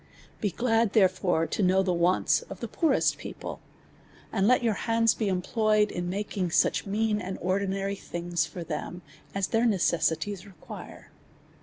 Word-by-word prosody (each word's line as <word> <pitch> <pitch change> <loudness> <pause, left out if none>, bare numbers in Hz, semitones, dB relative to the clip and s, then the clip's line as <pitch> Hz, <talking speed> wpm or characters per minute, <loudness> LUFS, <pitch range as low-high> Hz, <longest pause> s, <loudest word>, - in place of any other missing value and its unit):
Begird, 225 +2 +1
therefore, 185 -5 +3
to 210 - -2
know 190 0 +4
the 185 -1 +1
wants 175 +2 +2
of - - -8
the - - -4
poor 325 -3 +1
est - - +1
people, - - -7 0.7
and 195 +1 +2
let 250 +1 +4
your 225 -2 +2
hands 225 +2 +2
be 220 - -2
employed 210 +3 +1
in 175 0 -3
making 195 -1 -2
such 170 - +2
mean 210 +1 0
and 190 +1 -5
ordinary 195 +1 -1
things 175 -3 -2
for 175 - -7
them, 165 +2 -5 0.3
as 195 -1 +1
their 230 +1 +2
ne 210 -4 +2
cessities 175 +3 0
require. 195 -5 -11
195 Hz, 160 wpm, -27 LUFS, 180-215 Hz, 0.7 s, know